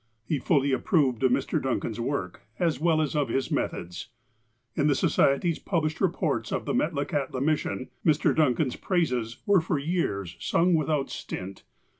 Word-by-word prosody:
He 145 +4 -1
fully 140 -1 +2
approved 135 - +2
of 130 - +4
Mr. - - 0
Duncan's 120 -3 -2
work, 115 -7 -3 0.2
as 165 -3 0
well 160 -1 +3
as 150 - -3
of 145 -4 +1
his 135 +2 -1
methods. 90 +4 -3 0.7
In 145 - +1
the 145 - +3
Society's 145 +5 +2
pub 170 -5 -1
lished 155 0 -2
reports - - 0
of - - -2
the - - -1
Metlakahtla 145 -4 -1
mission, 150 -3 -1
Mr. 155 -1 +3
Duncan's 140 -3 +2
praises 125 - -1
were 200 -4 +4
for 160 -1 -1
years 140 - -2
sung 175 +2 +2
without 155 -3 +1
stint. 95 +1 -6
145 Hz, 160 wpm, -27 LUFS, 125-160 Hz, 0.7 s, of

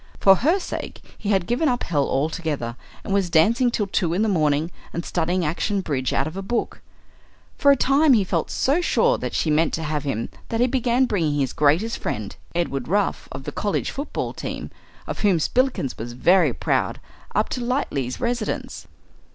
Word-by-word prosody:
For 195 -1 +6
her 320 - +3
sake - - -6 0.2
he 205 - -5
had 190 -4 +2
given 250 - +1
up 245 -1 -1
hell 145 -4 0
altogether, 145 -4 -2 0.3
and 195 - -3
was 195 -3 +1
dancing 225 +10 +4
till 220 -3 -1
two 175 -3 0
in 205 - +2
the - - +2
morning 155 -3 +1 0.2
and 170 - -3
studying 175 +1 0
action 195 +6 -1
bridge 135 -7 -1
out - - +1
of 160 +2 -6
a 195 - -3
book. 230 +5 -2 0.8
For 285 - +5
a 280 - +8
time 275 +3 +4
he 215 -5 +4
felt 175 -3 -1
so 290 +7 +1
sure 485 +7 +2
that - - -4
she 155 - +1
meant 155 +2 +2
to 160 - -4
have 150 -1 -2
him 125 -6 -2 0.2
that 225 - -1
he 245 - +5
began 250 0 +2
bringing 160 - 0
his 135 -3 0
greatest 160 +11 +2
friend, 105 -2 -4 0.2
Edward 140 -7 -1
Ruff 200 +4 0
of 130 +1 -7
the - - -5
college 205 - -1
football 280 +3 -4
team, - - -6 0.3
of - - -5
whom 200 -4 +3
Spillikins 245 - 0
was 120 +2 -5
very 175 +10 +4
proud, - - -1 0.4
up - - +2
to - - -3
the 240 - -3
Lightleighs' 140 - -1
residence. 240 -3 -3
185 Hz, 195 wpm, -23 LUFS, 150-240 Hz, 0.8 s, a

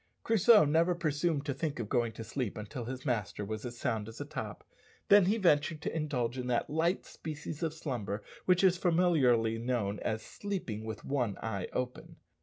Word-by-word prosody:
Crusoe 225 -3 +6
never 165 +4 +3
presumed 155 -2 0
to 140 - -1
think 145 +2 -3
of 115 - -3
going 120 0 +1
to 115 - -7
sleep 120 -1 -3
until 110 +3 -6
his 130 +2 -6
master 105 -5 -1
was 110 +1 -4
as 120 0 -8
sound 110 -3 -1
as 115 - -11
a - - -4
top, - - -6 0.5
then 205 -2 +8
he 205 +5 +2
ventured 155 -5 +3
to - - -3
indulge 130 -6 -1
in 125 - -3
that 125 +2 0
light 165 +4 +1
species 150 0 -7
of 165 -2 0
slumber 120 -10 -4 0.2
which 180 0 +4
is 185 -1 +5
familiarly 145 -11 +3
known 115 -4 -1
as 110 0 -2
"sleeping 180 - -4
with 110 -1 -6
one 125 -8 -1
eye 100 -5 -2
open." 125 0 -4
130 Hz, 190 wpm, -32 LUFS, 115-165 Hz, 0.5 s, then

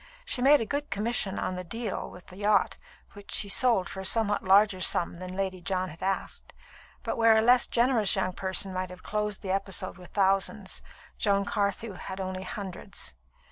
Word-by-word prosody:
She 255 - -1
made 285 +3 +6
a 225 - -2
good 290 +4 -3
commission 210 -2 -1
on 185 - -2
the 180 - -5
"deal" 225 +3 -4
with 180 - -13
the 185 - -13
yacht, 205 -1 +2 0.4
which 205 0 -13
she 205 - +4
sold 215 -4 +3
for 190 - -7
a - - -5
somewhat 205 +1 +2
larger 195 0 +4
sum 170 -2 +3
than 185 0 -7
Lady 190 -2 -3
John 185 0 -1
had 165 - -12
asked; 190 0 -3 0.5
but - - -3
where 225 -1 +5
a - - +4
less 245 +2 +5
generous 235 -4 +3
young 185 -1 -1
person 190 +1 -1
might 185 0 -3
have 180 0 -12
closed 210 -1 -2
the 190 - -2
episode 195 -1 -3
with 180 - -13
thousands, 195 0 0 0.4
Joan 200 -1 +2
Carthew 205 +1 -1
had 190 +1 -7
only 185 0 -4
hundreds. 190 - -6
195 Hz, 190 wpm, -28 LUFS, 185-215 Hz, 0.5 s, made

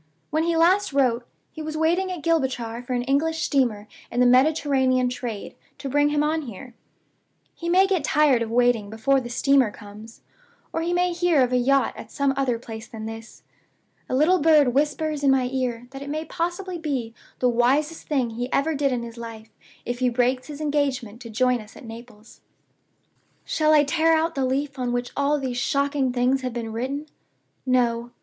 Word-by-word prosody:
When 310 +1 +1
he 335 0 +1
last 360 +1 +3
wrote, 245 -3 +1 0.2
he 315 - -8
was 310 0 -4
waiting 345 +4 +1
at 355 -4 -6
Gibraltar 260 -8 -1
for 250 +1 -5
an 245 0 0
English 315 +5 0
steamer 235 -7 0 0.2
in 240 - -2
the 250 - +5
Mediterranean 260 -1 +3
trade 240 -4 -6 0.2
to 275 - -6
bring 290 +2 +3
him 295 0 +1
on 315 +1 0
here. 245 -1 -9 0.8
He 340 - -5
may 370 +2 +5
get 380 -6 0
tired 295 -4 +3
of 230 - -2
waiting 240 -3 +2
before 245 +5 +1
the 240 - -7
steamer 270 0 +3
comes, 210 +2 -13 0.5
or 325 - -1
he 340 +1 -1
may 355 0 +1
hear 340 -5 +3
of 250 - -1
a - - +4
yacht 270 +2 +2
at - - -10
some 280 -1 +1
other 265 -3 0
place 225 -1 -9
than 220 -1 -8
this. 225 0 -9 0.7
A - - 0
little 330 +7 +4
bird 300 -5 +5
whispers 295 +1 0
in 275 - +4
my 265 -2 +3
ear 245 -2 -2
that 270 0 -9
it 280 - -7
may 310 +2 -3
possibly 350 +1 -3
be 265 -8 -3 0.2
the 250 - +1
wisest 265 +7 +1
thing 260 -6 0
he 245 +3 -4
ever 315 +3 +1
did 280 -2 0
in 245 -2 -2
his 235 0 -9
life 225 -1 -9 0.3
if 245 0 -3
he 255 -1 +2
breaks 250 +1 0
his 295 -1 -8
engagement 275 -7 -1
to 230 - -9
join 250 +1 +1
us 210 0 -15
at 270 - -12
Naples. 225 -1 -12 1.0
"Shall 310 -1 +1
I 300 -1 +6
tear 325 +3 +2
out 325 +1 0
the 270 -3 0
leaf 275 +1 -2
on 245 -1 -1
which 245 0 -2
all 285 +1 +1
these 260 -3 -3
shocking 280 +1 0
things 250 +2 +1
have 255 -2 -4
been 230 -2 -5
written? 270 +6 -3 0.6
No. 240 -2 +1
265 Hz, 195 wpm, -24 LUFS, 240-300 Hz, 1.0 s, I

